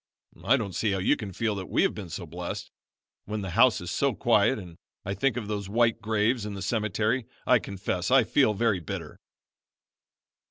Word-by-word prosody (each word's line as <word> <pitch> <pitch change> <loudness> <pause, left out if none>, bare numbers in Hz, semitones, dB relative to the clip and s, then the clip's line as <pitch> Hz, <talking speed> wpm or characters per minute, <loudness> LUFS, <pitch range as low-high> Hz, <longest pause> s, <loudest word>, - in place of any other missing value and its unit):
"I 135 - +4
don't 100 -6 -4
see 105 +1 0
how - - 0
you 95 +10 +2
can 105 -7 -6
feel 110 +3 -1
that 95 -2 -6
we - - +2
have - - +2
been 95 -4 -7
so 85 +2 -6
blessed. 85 +2 -6 0.5
When 105 0 -3
the 95 -2 -5
house 115 +5 +5
is 90 0 -5
so 140 +4 +1
quiet 115 +2 +3
and 90 -5 -10 0.3
I 100 - -2
think 125 +7 0
of 110 -4 -4
those 100 -2 -4
white 115 +1 +2
graves 110 +2 +1
in 105 -1 -5
the 95 - -5
cemetery 110 +3 0 0.2
I 125 -2 +5
confess 95 -2 -3
I 130 -1 +6
feel 115 0 +2
very 110 -2 +1
bitter." 80 - -7
105 Hz, 200 wpm, -27 LUFS, 95-115 Hz, 0.5 s, I